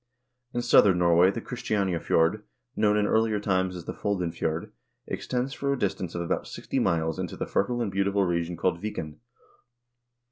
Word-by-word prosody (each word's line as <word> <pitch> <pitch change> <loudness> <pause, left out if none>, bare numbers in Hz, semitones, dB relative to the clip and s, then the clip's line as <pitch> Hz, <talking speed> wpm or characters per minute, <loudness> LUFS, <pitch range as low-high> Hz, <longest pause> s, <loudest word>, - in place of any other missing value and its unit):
In 120 -1 -2
southern 100 -6 +6
Norway 85 +1 +5
the 115 +4 -3
Christianiafjord, 95 - 0 0.3
known 105 0 +3
in 105 - +2
earlier 110 0 +2
times 95 -2 0
as 85 -2 -8
the - - -4
Foldenfjord, 85 -5 -2 0.3
extends 130 +2 -3
for 140 0 -1
a 140 - 0
distance 95 -6 -2
of 85 - -2
about 85 - -2
sixty - - -3
miles 80 -1 0
into - - -4
a - - -2
fertile 120 +4 0
and 100 - -3
beautiful 100 0 +1
region 85 -1 -1
called 85 0 0
Viken. 80 -8 -5
95 Hz, 165 wpm, -27 LUFS, 85-105 Hz, 0.3 s, southern